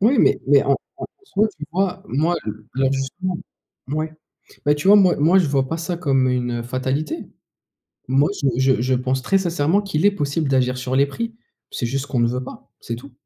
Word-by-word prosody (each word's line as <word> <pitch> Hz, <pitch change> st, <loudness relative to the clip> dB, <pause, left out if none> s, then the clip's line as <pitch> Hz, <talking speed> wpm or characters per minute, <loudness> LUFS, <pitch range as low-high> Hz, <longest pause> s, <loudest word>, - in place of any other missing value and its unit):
Oui, 235 Hz, +6 st, +4 dB
mais -, -, +4 dB
mais 140 Hz, 0 st, +5 dB
en 140 Hz, 0 st, +3 dB, 0.2 s
en -, -, -6 dB, 0.2 s
soit, 215 Hz, -, +1 dB
tu 150 Hz, -, -6 dB
vois, 190 Hz, +1 st, 0 dB
moi 160 Hz, +6 st, +1 dB
le 105 Hz, 0 st, -7 dB
le 135 Hz, 0 st, +2 dB
justement. 175 Hz, +7 st, -3 dB, 0.5 s
Mouais. 155 Hz, +3 st, -3 dB, 0.5 s
Bah 145 Hz, -, +5 dB
tu 150 Hz, +6 st, -1 dB
vois, 205 Hz, -, +9 dB
moi 185 Hz, -3 st, +5 dB
moi, 165 Hz, +6 st, +4 dB
je 175 Hz, -, +3 dB
vois 135 Hz, -1 st, +1 dB
pas 165 Hz, -, -2 dB
ça 170 Hz, +1 st, -3 dB
comme 135 Hz, -6 st, +2 dB
une 120 Hz, -1 st, -1 dB
fatalité. 130 Hz, +5 st, -3 dB, 0.8 s
Moi, 135 Hz, +3 st, +3 dB
je 140 Hz, -, +3 dB
je 130 Hz, -2 st, +3 dB
je 130 Hz, +1 st, +1 dB
pense 130 Hz, +1 st, -1 dB
très 195 Hz, +9 st, +2 dB
sincèrement 175 Hz, +1 st, +1 dB
qu'il 195 Hz, -3 st, -1 dB
est 205 Hz, -, +6 dB
possible 150 Hz, -4 st, -1 dB
d'agir 125 Hz, -1 st, +2 dB
sur 125 Hz, +1 st, -2 dB
les 140 Hz, +1 st, +5 dB
prix. 230 Hz, +10 st, -5 dB, 0.4 s
C'est 120 Hz, -, -3 dB
juste 135 Hz, +3 st, -2 dB
qu'on 130 Hz, -, -1 dB
ne 120 Hz, -, +3 dB
veut 125 Hz, +2 st, -2 dB
pas, -, -, -11 dB
c'est 115 Hz, -, -4 dB
tout. 135 Hz, +4 st, -12 dB
140 Hz, 215 wpm, -21 LUFS, 130-175 Hz, 0.8 s, vois